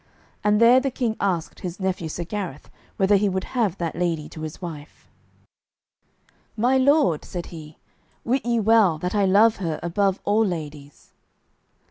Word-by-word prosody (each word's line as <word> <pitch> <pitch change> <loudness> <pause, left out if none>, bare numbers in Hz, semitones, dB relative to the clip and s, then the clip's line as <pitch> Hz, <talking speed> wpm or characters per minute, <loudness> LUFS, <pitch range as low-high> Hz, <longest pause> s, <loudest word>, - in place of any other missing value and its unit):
And 210 0 +3
there 235 +2 +7
the 270 +1 -1
King 240 -4 -2
asked 180 -5 -2
his 180 0 -6
nephew 185 -4 -2
Sir 175 - -4
Gareth 180 -5 -6 0.3
whether 195 +1 +4
he 200 +1 +1
would 190 0 -2
have 215 -7 -1
that 170 -2 -3
lady 165 -3 -1
to 155 - -10
his 155 -1 -6
wife. 160 -5 -9 1.5
"My 245 +4 +2
lord," 265 - +3
said 175 -2 -6
he, 155 -2 -10 0.5
"wit 255 +3 0
ye 235 -1 +1
well 215 -6 +4
that 180 +4 -4
I 205 -2 +2
love 210 +4 +4
her 165 -5 -3
above 190 +2 0
all 210 +2 +3
ladies." 150 -6 -6
190 Hz, 160 wpm, -23 LUFS, 165-220 Hz, 1.5 s, there